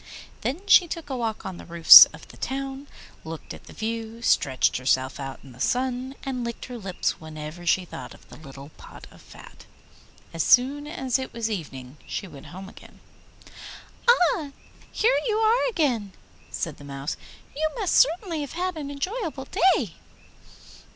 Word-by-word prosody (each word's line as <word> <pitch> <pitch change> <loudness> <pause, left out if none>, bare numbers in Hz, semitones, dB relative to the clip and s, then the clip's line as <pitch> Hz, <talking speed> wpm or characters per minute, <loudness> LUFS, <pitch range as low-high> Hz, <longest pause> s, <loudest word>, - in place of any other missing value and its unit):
Then 315 +11 -3
she 365 -3 +6
took 320 -3 -6
a - - -2
walk 225 -4 -3
on 190 -2 -6
the - - -11
roofs 170 -1 +11
of - - -14
the - - -14
town, 270 +1 -5 0.4
looked 160 0 -8
at - - -13
the - - -13
view, 225 +1 -5
stretched 130 - +2
herself 130 +1 0
out 135 -1 -7
in 135 - -13
the 125 - -16
sun, 255 - -1
and 255 -2 -3
licked 235 0 -5
her 250 -1 -8
lips 190 -5 -3
whenever 155 +2 -8
she 185 +1 +2
thought 165 -1 -9
of - - -21
the - - -13
little 140 -1 -12
pot - - -13
of - - -17
fat. - - -15 0.7
As 165 - -2
soon 275 - +3
as 265 -6 -1
it 260 - -6
was 230 -1 -3
evening 135 -8 -7
she 195 - -5
went 140 -6 -12
home 190 +2 -9
again. - - -15 1.1
'Ah, 350 -9 +3 0.4
here 480 +4 +2
you 430 -2 +1
are 450 +3 +3
again!' 245 - -1 0.4
said 165 -5 -4
the - - -13
Mouse; 140 +1 -5 0.4
'you 310 +2 0
must 415 -7 -1
certainly 330 +2 +2
have 285 - -6
had 360 0 -3
an 290 -2 -5
enjoyable 300 - -4 0.3
day. 210 - -3
240 Hz, 170 wpm, -25 LUFS, -, 1.1 s, roofs